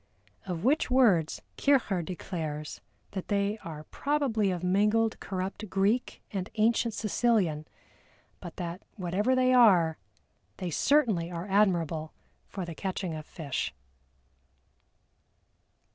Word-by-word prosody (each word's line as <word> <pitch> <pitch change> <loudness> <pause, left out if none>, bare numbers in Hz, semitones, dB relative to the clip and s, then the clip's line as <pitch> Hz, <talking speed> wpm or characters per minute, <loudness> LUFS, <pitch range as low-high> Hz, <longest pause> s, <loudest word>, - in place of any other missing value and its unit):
Of 175 -2 -3
which 280 +5 +2
words 215 -12 +3
Kircher 245 -10 +2
declares 160 -4 -5 0.3
that 190 -2 -5
they 205 +1 0
are 155 -4 -8
probably 265 - 0
of 180 -1 -3
mingled 210 +4 +2
corrupt 190 +2 -4
Greek 200 +6 0
and 190 0 -3
ancient 225 +1 +2
Sicilian, 200 -9 +1 0.7
but 175 -3 -9
that 175 +1 -5
whatever 205 +6 0
they 255 0 +3
are, 185 -10 +5 0.6
they 180 -2 -4
certainly 215 - +2
are 170 0 -5
admirable 170 -6 +1 0.3
for 190 -3 -5
the 170 - -6
catching 185 0 -3
of 155 -1 -7
fish. 140 - -4
190 Hz, 115 wpm, -29 LUFS, 170-225 Hz, 0.7 s, are